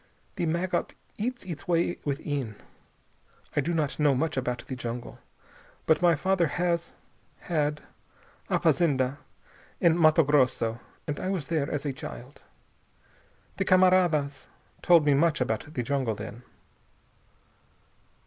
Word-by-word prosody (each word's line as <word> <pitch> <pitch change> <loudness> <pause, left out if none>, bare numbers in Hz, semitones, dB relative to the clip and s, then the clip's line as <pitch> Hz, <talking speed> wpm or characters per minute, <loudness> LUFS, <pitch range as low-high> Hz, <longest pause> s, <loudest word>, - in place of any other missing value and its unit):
The 175 -4 -1
maggot 170 +3 -1 0.2
eats 245 +3 -3
its 175 +1 -7
way 170 0 +1
within. 140 -5 -3 1.0
I - - +3
do 170 - -2
not 155 -4 -1
know 145 -2 +4
much 155 +4 -1
about 125 -2 -2
the 130 - -5
jungle, 120 -1 -6 0.7
but 160 - +3
my 175 -2 +5
father 180 +2 +1
has 170 +2 -1 0.5
had 150 -3 -1 0.7
a - - +2
fazenda 140 -4 +2 0.6
in 170 0 +3
Matto 155 +1 +6
Grosso 130 -5 +2 0.3
and 145 -1 -3
I 185 - -2
was 180 -7 -3
there 155 -4 0
as 145 0 -3
a 140 - -1
child. 65 - -9 1.2
The 195 - 0
camaradas 180 -7 +3 0.3
told 170 -4 +5
me 145 - +5
much 155 +2 +2
about 125 +3 -2
the 125 -6 -2
jungle, 130 -3 -1
then." 110 +3 -8
150 Hz, 130 wpm, -27 LUFS, 135-170 Hz, 1.2 s, Matto